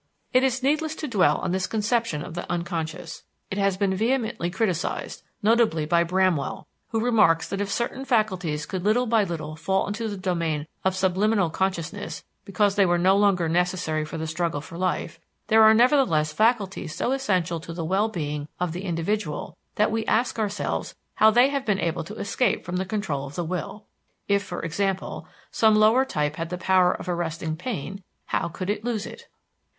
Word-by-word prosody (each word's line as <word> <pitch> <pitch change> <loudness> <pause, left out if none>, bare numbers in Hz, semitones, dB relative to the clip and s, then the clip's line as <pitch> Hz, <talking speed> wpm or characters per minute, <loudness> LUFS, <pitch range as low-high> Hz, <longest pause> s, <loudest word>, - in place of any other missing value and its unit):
It 255 - +5
is 260 -1 +1
needless 310 +3 +1
to 305 - -5
dwell 205 -8 +3
on 185 - -2
this 185 0 0
conception 220 -7 0
of - - -8
the 175 - -5
unconscious. 170 -1 -4 0.3
It 195 - -2
has 195 -1 +1
been 195 -1 +1
vehemently 225 -2 0
criticised, 185 -3 -2 0.2
notably 215 -8 +3
by 170 +2 +3
Bramwell, 180 -3 0 0.2
who 225 - -1
remarks 210 -9 +4
that 195 - -3
if 200 - -2
certain 240 +5 -2
faculties 185 - 0
could 180 +3 -4
little 220 +5 +3
by 225 -2 +3
little 155 -4 -5
fall 190 +4 0
into 215 +3 -3
the 205 - -5
domain 170 -5 -1 0.2
of 190 0 +1
subliminal 190 0 +2
consciousness 190 +2 -3 0.2
because 200 0 +2
they 200 -1 +4
were 175 0 +3
no 185 +3 +4
longer 195 -4 +3
necessary 175 -2 0
for 155 +2 -6
the 160 - -3
struggle 160 -1 -1
for 155 +3 -11
life, 175 -2 -2 0.3
there 220 0 +6
are 220 0 +8
nevertheless 225 - +3
faculties 210 -7 +1
so - - -1
essential 185 -11 0
to 165 - -9
the 165 -1 -4
well 195 +6 +1
being 150 -6 -4
of 180 -2 -1
the 180 +4 -5
individual 170 -1 -2 0.2
that 210 - +2
we 225 0 0
ask 235 +1 +1
ourselves 205 -1 -2 0.2
how 215 - +6
they 245 +4 +5
have 280 -1 -2
been 210 -6 0
able 165 -1 -1
to 205 +7 -9
escape 230 +4 0
from 180 0 -3
the 190 - -1
control 170 -9 -3
of 140 - -11
the 175 - -2
will. 185 +5 -5 0.4
If, 200 0 +3
for 185 -3 -6
example, 190 +3 -2 0.2
some 220 -1 +4
lower 220 +5 +5
type 150 - -2
had 165 0 -3
the 180 - -3
power 185 0 +4
of - - -6
arresting 165 -2 -2
pain, 195 - -5 0.2
how - - -1
could 185 +4 -3
it 210 0 -4
lose 225 -3 -2
it? - - -10
190 Hz, 190 wpm, -25 LUFS, 170-215 Hz, 0.4 s, are